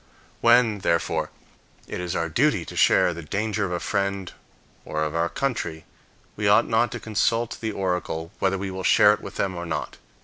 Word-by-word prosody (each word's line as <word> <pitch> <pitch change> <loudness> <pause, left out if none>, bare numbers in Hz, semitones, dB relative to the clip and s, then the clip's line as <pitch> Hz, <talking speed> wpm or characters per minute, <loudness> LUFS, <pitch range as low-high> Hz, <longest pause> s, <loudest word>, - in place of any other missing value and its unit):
When, 115 -3 +4
therefore, 85 -3 0 0.6
it - - -5
is 90 -1 -3
our 85 - 0
duty 105 - +1
to - - -9
share 90 - +4
the 85 - -7
danger 105 +5 -2
of 90 - -4
a 90 - -1
friend 100 -1 -2 0.5
or 75 0 -2
of 75 0 -2
our 85 +1 0
country, 100 -13 -3 0.5
we 105 -1 -1
ought 105 +1 +5
not 115 +1 +2
to - - -4
consult 115 +2 0
the 110 -1 -2
oracle 90 -4 -3
whether 95 0 +1
we 95 0 -4
will 95 0 -5
share 105 +2 +6
it - - -5
with - - -9
them 95 -2 -1
or 85 0 -5
not. 80 -2 -4
95 Hz, 195 wpm, -24 LUFS, 85-110 Hz, 0.6 s, share